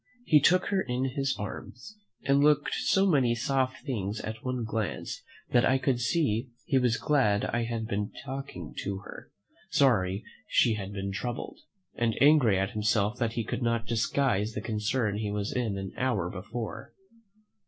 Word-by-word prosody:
He 155 -8 +6
took 180 +5 +3
her 195 -1 +2
in 130 -3 -1
his 135 0 -1
arms, 125 - -7 0.3
and 140 +1 +3
looked 150 -1 +3
so 195 0 +2
many 135 -10 +3
soft 130 +3 -1
things 105 -6 -2
at 110 +1 -6
one 125 -2 -2
glance 110 +3 -3 0.3
that 120 -1 +4
I 130 - +4
could 130 -2 0
see 125 -2 +1 0.2
he 140 -5 +3
was 125 -2 +2
glad 125 -9 +2
I 120 -1 -1
had 115 -1 -3
been 105 -2 -2
talking 135 - -6
to 100 -1 -3
her, - - -10 0.4
sorry 115 - +2 0.2
she 115 - +4
had 100 -2 -4
been 100 -1 -4
troubled, 120 - -4 0.3
and 115 -2 0
angry 140 -9 +5
at 95 +3 0
himself 110 0 +1
that 115 -3 0
he 115 - -1
could 110 - -4
not 115 -1 0
disguise 115 -2 +1
the - - -3
concern 105 0 -1
he 105 -1 -2
was 105 0 -2
in 115 -6 -1
an 95 -1 -5
hour 105 -9 0
before. 110 +4 -6
120 Hz, 170 wpm, -29 LUFS, 105-135 Hz, 0.4 s, He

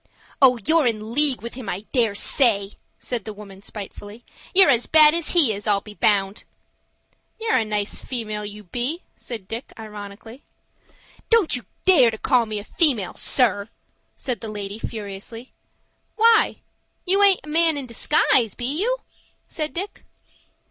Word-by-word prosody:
"Oh, 255 -2 +6
you're 320 -4 +3
in 220 -1 -3
league 285 -3 +4
with 235 - -7
him, 245 -5 -7
I 185 +1 -4
dare 230 -6 +1
say," 205 -4 +2 0.3
said 240 -4 -4
the 215 - -7
woman 200 -2 -13
spitefully. 205 +2 -9 0.3
"You're 380 -5 +6
as 245 -1 +1
bad 310 -1 +7
as 335 -2 0
he 300 -11 +6
is, 205 +1 -7
I'll 205 -1 +3
be 210 +1 -13
bound." 200 -1 0 1.0
"You're 450 0 +1
a 230 - +1
nice 210 -1 -3
female, 215 -4 -5
you 210 0 -8
be!" 250 - -4
said 220 -6 -8
Dick, 225 +4 -6
ironically. 215 +3 -10 0.9
"Don't 450 -10 +3
you 245 - -7 0.2
dare 295 -11 +6
to 220 - -6
call 245 -1 +1
me 215 -1 -4
a 205 - -6
female, 240 - +1
sir," 210 -5 0 0.5
said 250 -6 -4
the 225 - -6
lady, 205 0 -6
furiously. 220 +3 -8 0.6
"Why, 455 0 +3 0.4
you 390 +2 +2
aint 395 -2 +5
a - - -14
man 325 0 +3
in 280 - -4
disguise, 240 - +2
be 240 - -5
you?" - - 0 0.5
said 310 -2 -4
Dick. 385 +4 -5
235 Hz, 160 wpm, -22 LUFS, 210-300 Hz, 1.0 s, bad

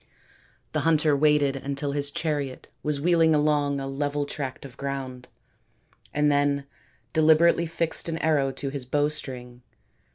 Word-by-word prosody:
The - - 0
hunter 155 -2 +3
waited 145 -1 +3
until 140 +1 -3
his 145 0 -2
chariot 145 -3 -3
was 150 -1 -1
wheeling 165 0 +4
along 145 -1 +1
a 135 - -4
level 145 +1 -2
tract 140 -2 -5
of 130 - -11
ground 135 -2 -5 0.8
and 150 0 +2
then 145 -1 +1 0.5
deliberately 160 +2 +4
fixed 165 0 -1
an 165 - -2
arrow 150 -4 +1
to 140 - -4
his 140 -2 -4
bowstring. 130 -4 -3
145 Hz, 135 wpm, -26 LUFS, 140-155 Hz, 0.8 s, wheeling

